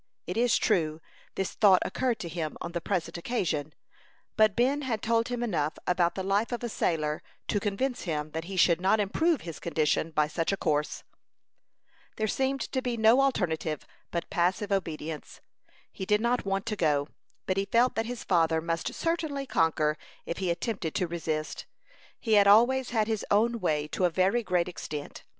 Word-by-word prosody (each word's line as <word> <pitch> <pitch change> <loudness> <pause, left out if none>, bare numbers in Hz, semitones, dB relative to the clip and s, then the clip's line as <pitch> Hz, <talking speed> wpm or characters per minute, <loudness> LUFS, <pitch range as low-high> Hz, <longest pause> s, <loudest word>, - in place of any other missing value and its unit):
It - - -4
is 240 0 +3
true, 155 -2 +1 0.4
this 195 - -2
thought 195 -4 +5
occurred 250 -3 0
to 175 - -4
him 160 -2 -4
on 170 - -5
the 170 0 -3
present 175 -2 -2
occasion; 160 - -2 0.6
but 215 -2 +4
Ben 270 +5 +2
had 235 -6 -2
told 230 0 +2
him 245 -1 -2
enough 160 -9 -1
about 175 -1 +2
the 190 - -3
life 200 +5 +1
of 240 0 -3
a 240 - -2
sailor 155 -7 -1 0.3
to 205 - +2
convince 230 +6 -1
him 155 -4 -3
that 160 +1 -4
he 190 +1 -6
should 170 -1 +4
not 195 +4 +3
improve 310 - +1
his 165 -2 -7
condition 160 -1 0
by 155 -1 +2
such 165 +3 -1
a 195 - -1
course. 150 -3 -1 1.1
There 220 - -1
seemed 270 +4 0
to 260 - -2
be 245 -2 -2
no 225 +4 +5
alternative 165 - 0 0.2
but 170 - -3
passive 185 +4 0
obedience. 160 -5 -3 0.5
He 190 - -6
did 210 0 +3
not 235 -1 0
want 195 +1 -1
to 225 -2 -2
go, 150 -5 +1 0.4
but 185 - -1
he 195 - +1
felt 235 +5 +3
that 225 0 -2
his 245 -1 -5
father 165 -3 +2
must 165 0 -2
certainly 315 -5 -1
conquer 155 - +1 0.3
if 170 - -4
he 185 -2 -1
attempted 170 -1 -2
to 180 - +1
resist. 160 -2 -4 0.5
He 225 - 0
had 200 -1 +6
always 245 +5 +5
had 220 -3 +1
his 220 -1 -2
own 230 +3 +2
way 150 -5 0
to 185 - 0
a - - +4
very 190 +7 +2
great 180 -4 0
extent. 150 -4 -7
190 Hz, 185 wpm, -28 LUFS, 165-230 Hz, 1.1 s, had